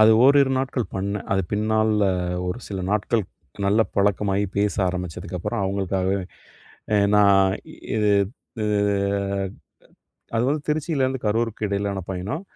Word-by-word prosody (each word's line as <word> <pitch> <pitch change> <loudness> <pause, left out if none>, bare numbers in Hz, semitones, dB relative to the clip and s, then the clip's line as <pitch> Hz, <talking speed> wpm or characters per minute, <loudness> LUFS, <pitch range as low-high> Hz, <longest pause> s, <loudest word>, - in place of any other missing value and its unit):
அது 110 +1 +8
ஓரிரு 140 0 +6
நாட்கள் 130 -4 -1
பண்ணேன். 100 +1 -3
அது 95 0 +2
பின்னால 110 -1 +2 0.4
ஒரு 110 - -3
சில 95 -2 -4
நாட்கள் 105 +1 +1 0.4
நல்ல 105 +3 +3 0.2
பழக்கமாகி 100 0 +2
பேச 100 0 +1
ஆரம்பிச்சதுக்கப்பறம் 90 +2 -4
அவங்களுக்காகவே 95 0 0 0.8
அ - - +5 0.2
நான் 100 -2 +5 0.2
இ - - -11 0.2
இது 105 -1 +2 0.5
அ - - 0 1.7
அது 115 - +2
வந்து 150 0 0
திருச்சியிலேருந்து 140 -4 0
கரூருக்கு 110 0 0
இடையிலான 100 0 -1
பயணம். 100 - -3
105 Hz, 120 wpm, -23 LUFS, 100-115 Hz, 1.7 s, அது